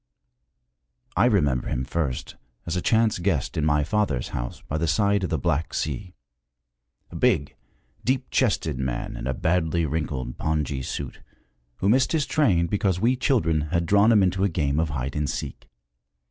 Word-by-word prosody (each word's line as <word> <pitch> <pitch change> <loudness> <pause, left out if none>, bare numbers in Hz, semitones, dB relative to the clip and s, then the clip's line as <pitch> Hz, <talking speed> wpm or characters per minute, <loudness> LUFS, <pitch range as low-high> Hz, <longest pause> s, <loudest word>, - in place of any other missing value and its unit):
I - - +4
remember 75 - +2
him 65 - -2
first 65 -3 -3 0.3
as 85 - -2
a 90 - 0
chance 110 -1 +2
guest 85 -7 -1
in 80 - 0
my 75 -1 +3
father's 100 - 0
house - - -5
by 75 - -2
the 85 - 0
side 100 +4 +2
of 90 - -1
the 80 - 0
Black 75 +4 -1
Sea 95 -4 -3 1.0
a - - -10
big, 70 - +1 0.5
deep 130 0 -1
chested 80 - +1
man 60 -3 -3
in - - -5
a 65 - -1
badly 85 0 +1
wrinkled 70 -5 -3
pongee 75 -3 -1
suit, 70 0 -5 0.5
who 95 - 0
missed 130 +7 +3
his 155 -3 +2
train 100 - +2
because 95 0 0
we 120 +6 +3
children 120 - +1
had 85 -1 0
drawn 100 +5 +5
him 105 -3 +5
into 95 +1 +1
a 100 - +3
game 75 -3 0
of 80 -1 0
hide 70 -2 -3
and 75 -2 -1
seek. - - -6
85 Hz, 175 wpm, -25 LUFS, 70-100 Hz, 1.0 s, drawn